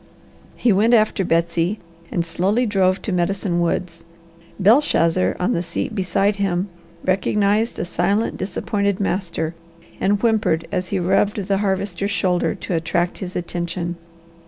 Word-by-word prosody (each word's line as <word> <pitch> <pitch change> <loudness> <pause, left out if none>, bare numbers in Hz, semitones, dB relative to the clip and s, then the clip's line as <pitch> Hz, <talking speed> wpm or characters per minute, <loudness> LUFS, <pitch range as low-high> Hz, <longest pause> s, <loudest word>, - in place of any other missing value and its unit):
He 235 - +3
went 220 +5 +4
after 215 -3 +2
Betsy 170 +3 +1 0.3
and 170 - 0
slowly 195 +8 +1
drove 190 -3 +1
to 215 - -2
Medicine 180 0 0
Woods. 170 0 -2 0.6
Belshazzar, 185 - +3
on 200 +7 +1
the 170 - 0
seat 170 +5 -3
beside 195 +1 +1
him, 195 -1 0 0.4
recognized 205 +4 +1
a - - -2
silent, 195 +5 0
disappointed 200 +1 -1
master 175 -5 -2 0.5
and 200 +1 +2
whimpered 215 -8 +1
as 185 -1 -1
he 200 - -1
rubbed 195 +3 +1
the 195 -1 +1
Harvester's 195 -1 -1
shoulder 180 -1 +1
to 190 - -5
attract 170 +1 0
his 185 -1 -6
attention. 175 0 -3
190 Hz, 135 wpm, -21 LUFS, 175-205 Hz, 0.6 s, went